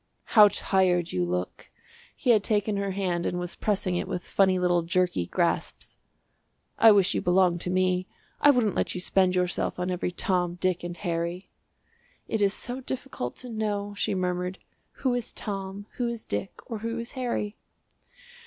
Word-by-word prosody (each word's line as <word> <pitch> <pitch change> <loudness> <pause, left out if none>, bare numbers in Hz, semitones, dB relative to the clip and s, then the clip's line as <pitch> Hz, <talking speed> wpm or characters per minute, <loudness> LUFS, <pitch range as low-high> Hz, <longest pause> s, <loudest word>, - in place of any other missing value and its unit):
"How 210 -3 +9
tired 185 -4 +1
you 90 - 0
look!" 90 +1 -3 0.5
He 245 - +2
had 215 -3 +4
taken 210 -1 +1
her 200 0 -1
hand 185 -3 -1
and 180 - -2
was 175 0 -4
pressing 195 -3 -1
it - - -2
with 180 - -3
funny 190 -1 +3
little 175 -1 +2
jerky 175 - 0
grasps. - - -2 0.8
"I 225 - +9
wish 200 -2 +4
you - - 0
belonged 180 -1 +3
to - - -2
me; 185 0 +1 0.3
I 290 - +6
wouldn't 245 -7 +3
let - - -1
you - - -2
spend 185 0 +2
yourself 180 -1 0
on 180 +1 -2
every 180 0 -1
Tom, 175 -1 0
Dick 180 -1 0
and 175 0 -5
Harry." 170 0 -3 0.8
"It 220 - -1
is 200 -1 +4
so 245 +5 -5
difficult 250 - -5
to 250 - -8
know," 205 -2 -2
she 205 -1 -1
murmured, 180 0 -2 0.4
"who 260 -2 -1
is 245 -2 -3
Tom, 195 0 -5
who 245 - 0
is 235 -1 -5
Dick, 100 - -3
or 225 -4 -5
who 230 +2 -3
is 235 0 -5
Harry!" 235 -5 -2
185 Hz, 175 wpm, -27 LUFS, 180-210 Hz, 0.8 s, How